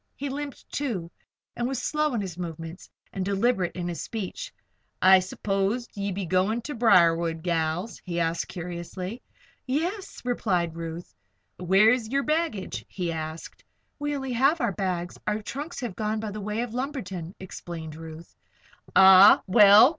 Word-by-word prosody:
He 280 Hz, +1 st, -4 dB
limped, 285 Hz, 0 st, -6 dB
too, 205 Hz, -12 st, -3 dB, 0.4 s
and 240 Hz, -, -1 dB
was 265 Hz, 0 st, -2 dB
slow 300 Hz, -3 st, 0 dB
in 220 Hz, -, 0 dB
his 185 Hz, -4 st, -5 dB
movements 165 Hz, 0 st, -7 dB, 0.2 s
and 190 Hz, -, -2 dB
deliberate 195 Hz, -1 st, +1 dB
in 175 Hz, -1 st, -3 dB
his 175 Hz, -1 st, -4 dB
speech. 225 Hz, -, -5 dB, 0.5 s
"I 190 Hz, 0 st, +7 dB
s'pose 195 Hz, +5 st, -1 dB
ye 200 Hz, 0 st, -3 dB
be 190 Hz, 0 st, -3 dB
goin' 185 Hz, +6 st, +1 dB
ter 295 Hz, -, -5 dB
Briarwood, 170 Hz, -, +4 dB
gals?" 170 Hz, +3 st, -1 dB
he 175 Hz, -2 st, -3 dB
added, 165 Hz, 0 st, 0 dB
curiously. 180 Hz, +5 st, -6 dB, 0.5 s
"Yes," 350 Hz, +9 st, -2 dB
replied 180 Hz, -9 st, 0 dB
Ruth. 165 Hz, -, -6 dB, 0.5 s
"Where's 215 Hz, +6 st, +4 dB
yer 275 Hz, +2 st, +1 dB
baggage?" 305 Hz, -, -1 dB
he 180 Hz, -3 st, -3 dB
asked. 160 Hz, 0 st, -6 dB, 0.4 s
"We 290 Hz, 0 st, -1 dB
only 265 Hz, -2 st, -3 dB
have 275 Hz, +7 st, +3 dB
our 235 Hz, -6 st, +1 dB
bags. 180 Hz, -2 st, -3 dB
Our 210 Hz, 0 st, -1 dB
trunks 295 Hz, +10 st, -5 dB
have 235 Hz, -7 st, -4 dB
gone 215 Hz, +2 st, -1 dB
by 215 Hz, -1 st, -4 dB
the 210 Hz, +1 st, -6 dB
way 210 Hz, +3 st, -2 dB
of 240 Hz, -2 st, -4 dB
Lumberton," 200 Hz, -, -4 dB
explained 170 Hz, -4 st, -7 dB
Ruth. 160 Hz, +1 st, -10 dB, 0.6 s
"Ah! 190 Hz, +1 st, +9 dB
Well! 205 Hz, +4 st, +8 dB
195 Hz, 155 wpm, -26 LUFS, 175-245 Hz, 0.6 s, Ah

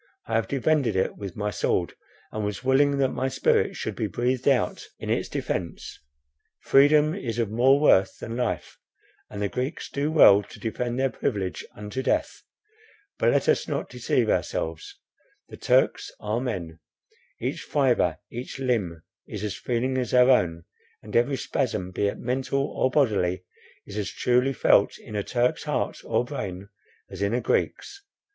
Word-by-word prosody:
I 115 Hz, -, -6 dB
have 115 Hz, 0 st, +1 dB
defended 140 Hz, -4 st, +1 dB
it 95 Hz, -, 0 dB
with 100 Hz, -3 st, -7 dB
my 105 Hz, 0 st, -2 dB
sword, 85 Hz, -1 st, 0 dB, 0.4 s
and 110 Hz, -, -3 dB
was 105 Hz, +4 st, -4 dB
willing 140 Hz, +2 st, +3 dB
that 135 Hz, -1 st, +2 dB
my 130 Hz, -, -1 dB
spirit 130 Hz, -, +1 dB
should -, -, -4 dB
be -, -, -1 dB
breathed 125 Hz, +2 st, -1 dB
out 135 Hz, -5 st, +1 dB
in -, -, -4 dB
its -, -, -1 dB
defence; 85 Hz, -4 st, -4 dB, 0.6 s
freedom 150 Hz, +3 st, +5 dB
is 120 Hz, -, -4 dB
of 115 Hz, -3 st, -1 dB
more 130 Hz, +5 st, +4 dB
worth 95 Hz, -10 st, +4 dB
than 115 Hz, -, -6 dB
life, 125 Hz, -2 st, -3 dB, 0.5 s
and 100 Hz, -, -7 dB
the -, -, +1 dB
Greeks 130 Hz, -, -4 dB
do 145 Hz, +2 st, -1 dB
well 105 Hz, -10 st, +7 dB
to 100 Hz, -, -13 dB
defend 120 Hz, +2 st, -3 dB
their 135 Hz, 0 st, +1 dB
privilege 95 Hz, -4 st, -2 dB
unto 105 Hz, +5 st, -5 dB
death. -, -, -1 dB, 0.8 s
But -, -, +3 dB
let -, -, +1 dB
us -, -, +2 dB
not -, -, -3 dB
deceive 125 Hz, -1 st, 0 dB
ourselves. 80 Hz, -6 st, -2 dB, 0.5 s
The -, -, -10 dB
Turks -, -, +2 dB
are 105 Hz, +3 st, -2 dB
men; 85 Hz, -11 st, -4 dB, 0.6 s
each -, -, -3 dB
fibre, -, -, +1 dB
each 125 Hz, +4 st, -6 dB
limb 105 Hz, -11 st, -1 dB, 0.2 s
is 105 Hz, -1 st, -6 dB
as 105 Hz, -2 st, -3 dB
feeling 130 Hz, +2 st, -1 dB
as 125 Hz, 0 st, -1 dB
our 125 Hz, +1 st, +6 dB
own, 85 Hz, -9 st, +2 dB, 0.4 s
and -, -, -9 dB
every 130 Hz, +4 st, +3 dB
spasm, 110 Hz, -7 st, -2 dB
be 100 Hz, +2 st, 0 dB
it 100 Hz, -, -3 dB
mental 135 Hz, +2 st, -1 dB
or 130 Hz, -, +2 dB
bodily, 100 Hz, -10 st, +1 dB, 0.4 s
is 105 Hz, +1 st, -6 dB
as 105 Hz, -, -2 dB
truly 125 Hz, +2 st, +1 dB
felt -, -, +3 dB
in 105 Hz, -, -10 dB
a 105 Hz, -, 0 dB
Turk's 120 Hz, +4 st, 0 dB
heart -, -, -2 dB
or -, -, 0 dB
brain, 95 Hz, +2 st, -6 dB, 0.4 s
as 95 Hz, 0 st, -7 dB
in 100 Hz, +3 st, +1 dB
a -, -, +1 dB
Greek's. 400 Hz, -, -1 dB
120 Hz, 170 wpm, -25 LUFS, 100-130 Hz, 0.8 s, well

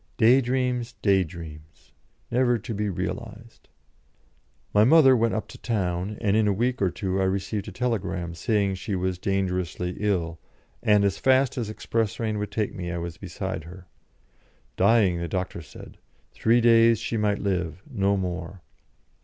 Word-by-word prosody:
Day 125 Hz, +3 st, +6 dB
dreams; 125 Hz, -1 st, -1 dB
day 95 Hz, -2 st, +4 dB
dreams! 80 Hz, -2 st, -11 dB, 0.4 s
never 120 Hz, 0 st, +3 dB
to 115 Hz, +1 st, -6 dB
be 105 Hz, 0 st, -1 dB
realised. 105 Hz, +5 st, -6 dB, 1.0 s
My 105 Hz, -, +6 dB
mother 135 Hz, +1 st, +7 dB
went 115 Hz, -1 st, +1 dB
up 110 Hz, -, -3 dB
to -, -, -12 dB
town, 95 Hz, -2 st, -2 dB
and 105 Hz, -3 st, +2 dB
in 110 Hz, -1 st, +3 dB
a 100 Hz, -, +3 dB
week 120 Hz, +4 st, -1 dB
or 95 Hz, -, +3 dB
two 95 Hz, +1 st, -2 dB
I -, -, +2 dB
received 95 Hz, +2 st, -2 dB
a -, -, -6 dB
telegram, 95 Hz, -8 st, -2 dB
saying 100 Hz, +2 st, 0 dB
she 100 Hz, +2 st, -3 dB
was 90 Hz, -1 st, -2 dB
dangerously 90 Hz, -2 st, -2 dB
ill, 85 Hz, -6 st, -1 dB, 0.4 s
and 105 Hz, -1 st, +4 dB
as 100 Hz, -1 st, 0 dB
fast 130 Hz, 0 st, +3 dB
as 115 Hz, -4 st, -3 dB
express 110 Hz, -1 st, -2 dB
train 110 Hz, -2 st, -2 dB
would 105 Hz, -1 st, -3 dB
take 105 Hz, 0 st, -2 dB
me 85 Hz, -1 st, -5 dB
I 85 Hz, -, -3 dB
was 85 Hz, -1 st, -5 dB
beside 95 Hz, -1 st, -5 dB
her. 90 Hz, +2 st, -11 dB, 0.9 s
Dying, 100 Hz, -3 st, +3 dB
the 85 Hz, -, -3 dB
doctor 90 Hz, 0 st, -3 dB
said; 80 Hz, -, -13 dB, 0.3 s
three 115 Hz, +2 st, +2 dB
days 115 Hz, 0 st, +5 dB
she 115 Hz, -, -4 dB
might 105 Hz, -2 st, +1 dB
live 90 Hz, -3 st, -2 dB
no 100 Hz, -7 st, +1 dB
more. 90 Hz, -1 st, -5 dB
100 Hz, 165 wpm, -25 LUFS, 90-115 Hz, 1.0 s, mother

